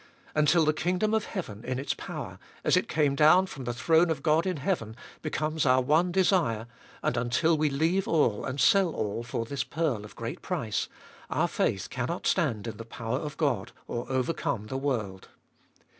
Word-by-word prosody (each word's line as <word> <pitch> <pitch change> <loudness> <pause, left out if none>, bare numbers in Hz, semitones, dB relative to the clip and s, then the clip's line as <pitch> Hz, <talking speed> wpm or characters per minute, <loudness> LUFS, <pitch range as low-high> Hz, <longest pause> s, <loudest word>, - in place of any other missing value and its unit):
Until 155 +2 +4
the 155 - +3
kingdom 180 +7 0
of 220 -1 +1
heaven 115 - -6
in 130 +1 -2
its 135 - -1
power, - - -7 0.2
as - - +4
it - - +2
came 145 -2 +2
down 155 +6 +6
from 140 -8 -8
the 120 - -1
throne 165 +6 +3
of 150 -4 -2
God 160 +3 +3
in 185 -3 -1
heaven, 130 - -2 0.3
becomes 155 0 -1
our 130 -1 +4
one 155 +7 +2
desire, 175 - +2 0.4
and - - +1
until 130 +8 +2
we 155 0 +2
leave 165 +7 +1
all 125 -10 +2
and 130 +2 -4
sell 185 +4 +4
all 105 +2 -2
for 115 -1 -3
this 135 +1 -2
pearl 145 -9 -1
of 105 - -12
great 115 0 -5
price, 110 -3 -2 0.4
our - - +1
faith - - -1
cannot - - -3
stand 105 -2 +1
in 110 -3 -5
the 115 - -6
power 115 +2 -3
of 150 0 -6
God, 120 -8 0
or 120 0 -4
overcome 130 -3 -1
the 120 - -6
world. 110 -9 -2
145 Hz, 190 wpm, -28 LUFS, 120-165 Hz, 0.4 s, down